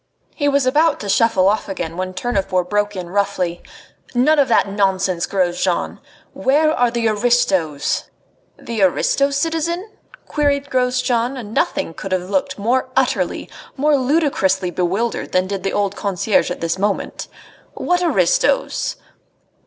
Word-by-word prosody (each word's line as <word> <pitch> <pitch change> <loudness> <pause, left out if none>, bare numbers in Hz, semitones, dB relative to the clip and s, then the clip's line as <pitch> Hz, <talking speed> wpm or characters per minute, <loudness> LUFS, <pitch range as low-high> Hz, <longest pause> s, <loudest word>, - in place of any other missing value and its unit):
He 290 -2 0
was 280 -2 +2
about 300 +4 +3
to 205 - -5
shuffle 195 -3 +3
off 210 +1 0
again 165 -4 -4
when 185 +1 -4
Tournefort 190 -5 -1
broke 205 0 0
in 180 -2 -6
roughly: 190 -3 -1 0.5
"None 295 +5 +4
of 280 - +4
that 230 - +3
nonsense, 190 -3 0
Grosjean! 180 -1 -1 0.3
Where 305 +4 +2
are 245 -5 +2
the 235 -1 0
aristos?" 200 -10 +1 0.5
"The 230 -3 -4
aristos, 275 +9 +2
citizen?" 335 +6 -2 0.4
queried 285 -1 0
Grosjean, 250 0 0
and 220 -4 -8
nothing 165 - 0
could 190 +3 -5
have 185 +1 -2
looked 185 -1 -1
more 245 +5 0
utterly, 265 -1 0 0.3
more 295 +2 +3
ludicrously 255 - +1
bewildered 190 +7 -2
than 185 0 +3
did 195 0 -4
the 195 +1 -2
old 200 -1 0
concierge 200 +1 0
at 180 - -5
this 165 +2 -1
moment. 205 0 -2 0.5
"What 355 0 0
aristos?" - - +1
210 Hz, 140 wpm, -19 LUFS, 185-270 Hz, 0.5 s, None